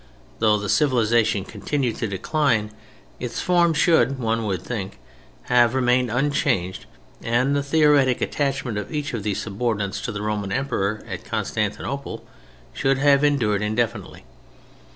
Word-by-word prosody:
Though 110 -1 +4
the 100 -1 -4
civilization 115 -6 +2
continued 120 +4 -2
to 115 - -2
decline, 110 - 0 0.5
its - - -4
forms 170 -3 +2
should, 160 -5 +3
one 115 -2 -1
would 95 -3 -2
think, 95 - -5 0.5
have 120 0 +3
remained 125 -1 +2
unchanged 115 -8 0 0.3
and 125 +4 +1
the 140 - +1
theoretic 140 -3 +3
attachment 135 -6 -1
of 105 - -7
each 150 -4 -3
of 115 - -3
these 100 -1 -2
subordinates 105 -2 -2
to 115 - -3
the 105 -1 -5
Roman 105 -2 -2
Emperor 110 -5 -1
at - - -6
Constantinople - - -3 0.5
should 135 0 +1
have 140 0 +4
endured 115 -9 +2
indefinitely. 110 - -2
120 Hz, 135 wpm, -23 LUFS, 105-140 Hz, 0.5 s, Though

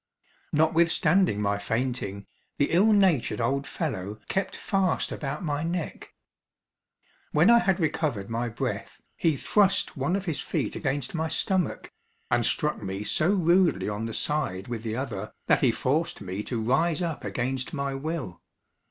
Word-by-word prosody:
Notwithstanding 160 - +3
my 100 0 +1
fainting, 115 -2 -2 0.3
the 140 - +1
ill 200 +6 +5
natured 180 - +3
old 135 +4 0
fellow 105 - -3
kept 190 0 -1
fast 195 -4 0
about 140 +3 -4
my 145 -3 -1
neck. 170 +2 -4 1.2
When - - +6
I 235 - +7
had 195 -4 +1
recovered 150 - -1
my 115 +1 -2
breath, 115 - -4 0.2
he 160 -4 +1
thrust 195 +4 +2
one 180 - 0
of 195 -1 -2
his 160 -6 -2
feet - - -2
against 135 -1 -2
my 160 -1 -1
stomach, 180 +2 0 0.4
and 120 0 +3
struck 150 -5 0
me 95 0 -4
so 155 +9 +1
rudely 180 -2 +3
on 105 +2 -3
the 115 - -5
side 135 -11 -1
with 120 -2 -4
the 110 -1 -3
other, 110 -6 -4
that - - +3
he 130 - +5
forced 160 +9 -1
me 95 0 -4
to 120 - -2
rise 150 +9 +1
up 165 -3 -3
against 130 +1 -2
my 140 -3 -2
will. 135 - -4
140 Hz, 155 wpm, -27 LUFS, 115-170 Hz, 1.2 s, I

